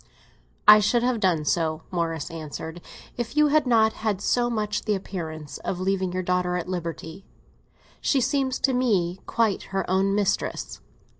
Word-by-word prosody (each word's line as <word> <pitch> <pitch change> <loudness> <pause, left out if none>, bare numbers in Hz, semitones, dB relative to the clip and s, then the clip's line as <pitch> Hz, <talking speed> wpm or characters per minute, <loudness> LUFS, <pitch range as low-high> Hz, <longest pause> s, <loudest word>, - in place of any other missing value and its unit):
"I 210 0 +10
should 235 +3 +2
have 245 -2 +1
done 175 -7 +1
so," 160 0 0
Morris 165 -4 -2
answered, 160 +1 -7 0.4
"if 240 +3 -4
you 300 0 +5
had 300 -2 +3
not 220 -2 +4
had 215 -3 -2
so 240 +4 +1
much 210 -3 -2
the 210 - +1
appearance 160 -6 -6
of 180 - -4
leaving 190 -1 0
your 185 +1 -2
daughter 180 0 0
at 175 - -4
liberty. 170 0 -5 0.8
She 275 - +2
seems 265 0 0
to 265 - +2
me 195 -8 +1
quite 225 -4 +1 0.2
her 195 - -1
own 195 +2 +2
mistress." 205 -2 -1
195 Hz, 160 wpm, -25 LUFS, 175-230 Hz, 0.8 s, I